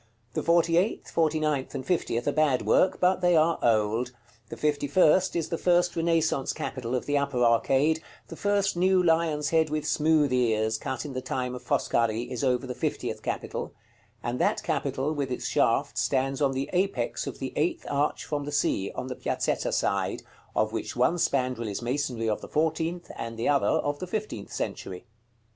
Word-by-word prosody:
The -, -, -1 dB
forty 170 Hz, 0 st, +3 dB
eighth, 190 Hz, +6 st, 0 dB
forty 160 Hz, -1 st, +1 dB
ninth, 150 Hz, -4 st, -1 dB
and 130 Hz, -, -4 dB
fiftieth 120 Hz, -9 st, -1 dB
are -, -, +3 dB
bad 145 Hz, -4 st, +2 dB
work, 185 Hz, -, +3 dB
but 185 Hz, +1 st, +3 dB
they 175 Hz, -1 st, +4 dB
are 160 Hz, +1 st, +3 dB
old; 115 Hz, +2 st, +1 dB, 0.4 s
the -, -, -7 dB
fifty 145 Hz, -1 st, 0 dB
first 185 Hz, +4 st, +4 dB
is 165 Hz, -2 st, -1 dB
the 165 Hz, -, -2 dB
first 175 Hz, 0 st, +2 dB
Renaissance 165 Hz, -4 st, +1 dB
capital 125 Hz, -1 st, -4 dB
of 125 Hz, -, -2 dB
the 145 Hz, 0 st, +1 dB
upper 140 Hz, -3 st, 0 dB
arcade: 135 Hz, +7 st, +3 dB, 0.3 s
the -, -, -8 dB
first 200 Hz, -2 st, +1 dB
new 185 Hz, +1 st, +3 dB
lion's 160 Hz, -3 st, +1 dB
head 160 Hz, -1 st, +3 dB
with 150 Hz, 0 st, -2 dB
smooth 155 Hz, -3 st, +2 dB
ears, 110 Hz, -3 st, +1 dB
cut 130 Hz, +2 st, -4 dB
in 145 Hz, -, -6 dB
the 130 Hz, -, -3 dB
time 125 Hz, -1 st, -3 dB
of 125 Hz, -, -6 dB
Foscari, 115 Hz, 0 st, 0 dB
is 125 Hz, -, -3 dB
over 125 Hz, -1 st, +1 dB
the 125 Hz, -, -4 dB
fiftieth -, -, -3 dB
capital; -, -, -4 dB, 0.5 s
and 120 Hz, +1 st, -2 dB
that -, -, +1 dB
capital, 140 Hz, +4 st, -1 dB
with 140 Hz, -3 st, -2 dB
its 125 Hz, -, -4 dB
shaft, -, -, +1 dB
stands 135 Hz, +1 st, 0 dB
on 135 Hz, -2 st, +2 dB
the 135 Hz, +1 st, -3 dB
apex 190 Hz, +2 st, -1 dB
of -, -, -5 dB
the -, -, -5 dB
eighth 345 Hz, -1 st, 0 dB
arch 145 Hz, +1 st, 0 dB
from 145 Hz, -2 st, -3 dB
the 145 Hz, -, -5 dB
Sea, 100 Hz, -8 st, 0 dB
on -, -, -4 dB
the 130 Hz, -1 st, -5 dB
Piazzetta -, -, -1 dB
side, -, -, 0 dB, 0.3 s
of 110 Hz, 0 st, +1 dB
which -, -, -4 dB
one 130 Hz, +8 st, +2 dB
spandril 125 Hz, -6 st, 0 dB
is 100 Hz, +4 st, -4 dB
masonry 125 Hz, -2 st, -1 dB
of 105 Hz, -, -1 dB
the -, -, -8 dB
fourteenth 160 Hz, +2 st, -1 dB
and 115 Hz, 0 st, -5 dB
the 115 Hz, -, -1 dB
other 140 Hz, -1 st, +3 dB
of 145 Hz, 0 st, 0 dB
the 185 Hz, -, -5 dB
fifteenth 205 Hz, -, -4 dB
century. 90 Hz, -1 st, -5 dB
145 Hz, 195 wpm, -27 LUFS, 125-165 Hz, 0.5 s, they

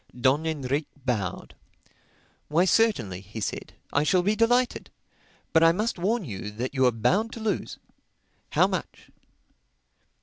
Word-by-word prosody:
Don 140 Hz, +6 st, +2 dB
Enrique 145 Hz, -1 st, -2 dB, 0.2 s
bowed. 105 Hz, -8 st, -2 dB, 0.9 s
"Why 165 Hz, +5 st, +3 dB
certainly," 145 Hz, -, +2 dB
he 105 Hz, +3 st, -9 dB
said, 105 Hz, -, -4 dB, 0.2 s
"I 145 Hz, -, +3 dB
shall 180 Hz, +4 st, +2 dB
be 205 Hz, +3 st, +2 dB
delighted. 245 Hz, +3 st, +1 dB, 0.6 s
But 160 Hz, -, +5 dB
I 165 Hz, -, +7 dB
must 215 Hz, +1 st, -2 dB
warn 205 Hz, +3 st, 0 dB
you 105 Hz, -4 st, -6 dB
that 120 Hz, +6 st, -4 dB
you 130 Hz, -2 st, +3 dB
are -, -, +4 dB
bound 195 Hz, -, +1 dB
to -, -, -7 dB
lose. 215 Hz, -4 st, -2 dB, 0.8 s
How -, -, +5 dB
much?" -, -, -5 dB
155 Hz, 140 wpm, -26 LUFS, -, 0.9 s, I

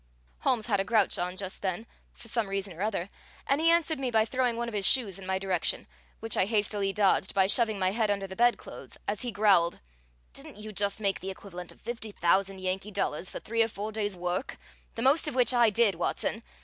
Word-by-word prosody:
Holmes 225 Hz, -4 st, +1 dB
had 205 Hz, -5 st, +1 dB
a -, -, +2 dB
grouch 215 Hz, -1 st, +2 dB
on 180 Hz, +1 st, -2 dB
just 190 Hz, -1 st, -4 dB
then, 190 Hz, +3 st, -2 dB, 0.3 s
for -, -, -14 dB
some 230 Hz, -1 st, 0 dB
reason 195 Hz, -1 st, -3 dB
or 170 Hz, -, -9 dB
other, 200 Hz, -4 st, -1 dB, 0.4 s
and 280 Hz, +3 st, +1 dB
he 330 Hz, -, +4 dB
answered 335 Hz, -3 st, +2 dB
me 260 Hz, -2 st, -1 dB
by 220 Hz, -2 st, +3 dB
throwing 250 Hz, -1 st, 0 dB
one 235 Hz, 0 st, -2 dB
of 235 Hz, -, -6 dB
his 200 Hz, -2 st, +3 dB
shoes 210 Hz, -8 st, +2 dB
in 190 Hz, -, -8 dB
my 190 Hz, 0 st, 0 dB
direction, 190 Hz, -2 st, -1 dB, 0.4 s
which 225 Hz, -1 st, 0 dB
I -, -, +3 dB
hastily 205 Hz, -2 st, 0 dB
dodged 195 Hz, -1 st, +2 dB
by 190 Hz, -1 st, +5 dB
shoving 220 Hz, +1 st, +2 dB
my 185 Hz, -1 st, +1 dB
head 220 Hz, 0 st, 0 dB
under 200 Hz, -1 st, 0 dB
the 190 Hz, 0 st, -8 dB
bedclothes 240 Hz, +2 st, -1 dB
as 205 Hz, 0 st, -1 dB
he 245 Hz, -2 st, -3 dB
growled: 200 Hz, -5 st, +3 dB, 0.5 s
"Didn't -, -, -9 dB
you 215 Hz, 0 st, -7 dB
just 200 Hz, +1 st, 0 dB
make 195 Hz, -2 st, +1 dB
the 190 Hz, -, -6 dB
equivalent 180 Hz, -2 st, -8 dB
of -, -, -19 dB
fifty 230 Hz, -1 st, -5 dB
thousand 190 Hz, +1 st, +1 dB
Yankee 185 Hz, +2 st, -2 dB
dollars 185 Hz, -4 st, -2 dB
for -, -, -6 dB
three 230 Hz, +1 st, -1 dB
or 225 Hz, -, +4 dB
four 215 Hz, 0 st, -5 dB
days' 205 Hz, -3 st, -2 dB
work, 180 Hz, +7 st, -3 dB, 0.4 s
the 230 Hz, -, -2 dB
most 290 Hz, +5 st, +4 dB
of 295 Hz, -, -3 dB
which 250 Hz, -1 st, +3 dB
I 240 Hz, -2 st, +5 dB
did, 215 Hz, -1 st, +3 dB
Watson? 170 Hz, 0 st, -2 dB
205 Hz, 225 wpm, -29 LUFS, 190-230 Hz, 0.5 s, by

